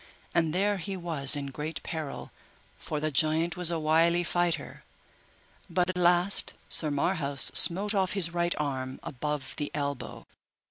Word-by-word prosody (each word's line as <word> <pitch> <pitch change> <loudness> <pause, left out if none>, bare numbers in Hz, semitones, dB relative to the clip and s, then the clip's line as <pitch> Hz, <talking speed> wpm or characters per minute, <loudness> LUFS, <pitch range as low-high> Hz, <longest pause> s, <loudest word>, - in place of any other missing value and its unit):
And 165 -2 +1
there 200 +4 0
he 195 +2 -6
was 160 -5 +4
in 140 -1 -5
great 150 +4 -6
peril, 155 -4 -6 0.5
for 150 - -5
the 155 +1 -3
giant 160 +4 +1
was 180 -2 +3
a 170 - -1
wily 165 +2 +2
fighter, 175 0 -3 0.9
but 180 +1 0
at - - -14
last 180 +2 +2
Sir 155 - +4
Marhaus 145 -2 +1
smote 200 +5 +6
off 190 -2 0
his 180 -5 0
right 175 0 -1
arm 130 -3 -4
above 140 0 -5
the 145 -1 -4
elbow. 140 -2 -5
165 Hz, 150 wpm, -27 LUFS, 145-175 Hz, 0.9 s, smote